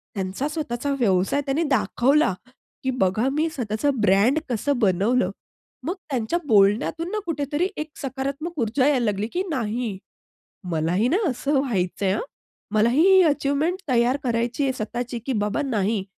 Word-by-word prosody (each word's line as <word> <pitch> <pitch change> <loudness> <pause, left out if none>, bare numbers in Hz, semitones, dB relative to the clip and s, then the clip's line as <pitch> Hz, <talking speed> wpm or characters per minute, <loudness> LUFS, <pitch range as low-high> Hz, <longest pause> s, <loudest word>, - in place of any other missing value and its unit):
त्यांचा 195 +7 -2
स्वतःचा 285 -3 -3
व्यवसाय 195 +4 +2
त्यांनी 285 +4 0
दाखवला 275 - +2 0.5
की 260 - 0
"बघा 195 +6 +2
मी 310 +3 +1
स्वतःच 220 -6 -4 0.2
ब्रँड 205 +10 +4
कसं 245 +3 0
बनवलं." 215 +5 +2 0.5
मग 350 +5 -1
त्यांच्या 255 +4 -1
बोलण्यातून 220 - +3
ना, 430 - -1
कुठेतरी 295 +1 -1
एक 305 +1 -4
सकारात्मक 275 +4 -4
ऊर्जा 240 +4 +2
यायला 265 -5 +2
लागली 205 0 -1
की 360 - 0
नाही. 230 - -2 0.7
मलाही 170 +7 +1
ना, 340 - +2
असं 275 +3 0
व्हायचं 200 -8 -1
आहे 190 - +2
हां. 215 - -1 0.5
मलाही 235 +7 +4
ही 380 -1 +7
अचिव्हमेंट 300 +3 +1
तयार 245 +1 +3
करायची 240 +2 0
आहे 265 -1 +1
स्वतःची 240 +1 -4
की 270 - -1
"बाबा 210 +7 -1
नाही," 215 -6 0
250 Hz, 150 wpm, -23 LUFS, 210-290 Hz, 0.7 s, ही